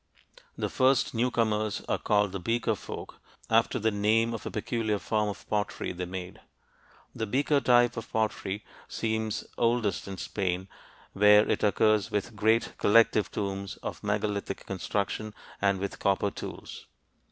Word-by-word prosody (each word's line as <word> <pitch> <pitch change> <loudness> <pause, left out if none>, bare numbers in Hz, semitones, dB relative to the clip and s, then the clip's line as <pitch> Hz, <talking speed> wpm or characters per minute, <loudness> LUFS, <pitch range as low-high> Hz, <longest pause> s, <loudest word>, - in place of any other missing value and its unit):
The - - -1
first 130 0 +2
newcomers 115 -3 0
are - - 0
called 105 -2 +2
the 95 - -4
Beaker 115 +4 0
folk, 105 - -8 0.3
after 115 +3 +3
the 110 -1 +1
name 110 +3 +2
of 115 - -5
a - - -2
peculiar 110 -1 -1
form 105 +1 0
of 100 - -8
pottery 105 -2 -2
they 90 0 -4
made. 90 0 -7 0.7
The 110 - -3
beaker 140 +5 +2
type 120 -2 +4
of 115 0 -6
pottery 105 -2 -2 0.2
seems 110 -1 -2
oldest 115 -6 +1
in 95 -1 -6
Spain, 95 -1 -2 0.5
where 105 +1 +6
it - - 0
occurs 105 0 +3
with 105 +2 -2
great 110 +2 +2
collective 105 -2 +4
tombs 100 -2 -4
of - - -5
megalithic 100 -1 -2
construction 100 +2 -3 0.3
and 100 -1 +3
with 100 +1 -4
copper 100 +1 +1
tools. - - -8
105 Hz, 145 wpm, -28 LUFS, 100-115 Hz, 0.7 s, where